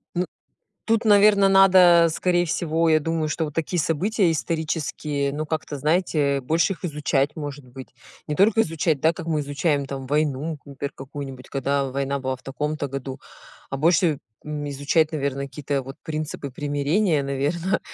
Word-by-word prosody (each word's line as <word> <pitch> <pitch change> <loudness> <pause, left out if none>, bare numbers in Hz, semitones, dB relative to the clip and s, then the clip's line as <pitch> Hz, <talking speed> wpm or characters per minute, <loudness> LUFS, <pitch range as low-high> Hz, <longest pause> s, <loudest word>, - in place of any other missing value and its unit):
Ну 180 +1 +1 0.6
Тут, 225 0 +2
наверное, 205 -1 +6
надо, 185 -3 +7
скорее 175 +1 +1
всего, 165 0 0
я 155 -1 +4
думаю, 160 0 -1
что 160 +1 -1
вот 150 - -8
такие 165 +2 -1
события 180 +5 +1
исторические, 155 -3 -2
ну, 150 +2 -3
как-то, 155 -1 -4
знаете, 150 -2 +1
больше 165 +8 +1
их 185 - -16
изучать, 150 -3 0
может 145 -3 -7
быть. 130 +1 -11 0.4
Не 150 - -2
только 215 +5 +4
изучать, 160 -6 0
да, 160 +3 +4
как 165 0 -8
мы 155 -2 0
изучаем 145 0 -1
там 135 -1 -6
войну, 150 +2 -1
например, 140 0 -6
какую-нибудь, 135 -1 -8
когда 140 0 -1
война 140 +1 -2
была 130 0 -2
в - - -24
таком-то 150 +2 -3
году. 135 -1 -6 0.5
А 135 - -4
больше, 160 0 +3 0.3
м, 150 -1 -4
изучать, 145 +3 +1
наверно, 140 -3 -2
какие-то 140 0 -3
вот 135 +1 -9
принципы 155 -3 -4
примирения, 145 +4 0
наверно, 145 +7 -1
150 Hz, 160 wpm, -23 LUFS, 140-165 Hz, 0.6 s, надо